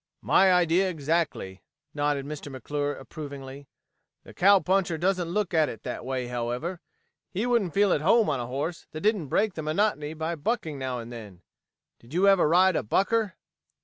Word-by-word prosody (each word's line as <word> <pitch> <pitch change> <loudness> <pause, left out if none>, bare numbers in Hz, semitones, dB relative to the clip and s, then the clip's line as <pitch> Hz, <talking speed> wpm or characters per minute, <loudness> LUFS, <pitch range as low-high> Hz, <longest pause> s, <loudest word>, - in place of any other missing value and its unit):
"My 190 -1 +5
idea 180 +1 +3
exactly," 155 - -2 0.3
nodded 145 -2 -1
Mr. 145 -1 -7
McClure 145 +2 -3
approvingly. 140 -3 -9 0.6
"The - - -13
cowpuncher 190 -2 +3
doesn't 180 0 0
look 195 0 -1
at 160 -2 +3
it 110 - -9
that - - -5
way, 130 0 -3
however. 125 +9 -3 0.5
He 200 +5 -2
wouldn't 230 -8 +1
feel 200 -2 +4
at 145 - 0
home 220 +7 +4
on 140 -4 0
a 120 - -4
horse 145 +7 -4
that 155 - -6
didn't 205 -7 +1
break 205 +8 +1
the 160 - -5
monotony 155 -1 0
by 160 +2 -2
bucking 165 - -2
now 130 -1 -3
and 120 0 -8
then. 105 -6 -10 0.6
Did 120 +7 -12
you 190 +3 +4
ever 195 -6 +5
ride 185 +2 +5
a - - +1
bucker?" 195 - 0
160 Hz, 175 wpm, -27 LUFS, 140-190 Hz, 0.6 s, My